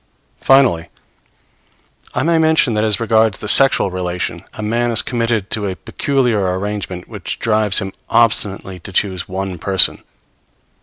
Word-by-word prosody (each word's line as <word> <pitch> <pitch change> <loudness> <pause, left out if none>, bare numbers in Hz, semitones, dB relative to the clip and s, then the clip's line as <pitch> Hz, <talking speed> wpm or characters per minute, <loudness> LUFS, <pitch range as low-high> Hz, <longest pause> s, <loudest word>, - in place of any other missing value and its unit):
Finally, 125 -12 +3 1.3
I - - 0
may 165 +1 +2
mention 160 -6 +2
that 105 0 0
as 105 -3 +2
regards 110 -2 +2
the 105 - -7
sexual 135 -4 +4
relation, 90 -1 -4
a 110 - -6
man 120 +3 0
is 115 -1 +3
committed 115 -4 -2
to 105 -2 -1
a 95 - -4
peculiar 110 -8 -1
arrangement 100 -2 -5
which - - -7
drives 110 -3 +2
him 95 -2 -1 0.2
obstinately 100 -5 0
to 95 - -10
choose 95 -1 -2
one 95 -1 -5
person. 95 +1 +3
105 Hz, 145 wpm, -17 LUFS, 95-115 Hz, 1.3 s, sexual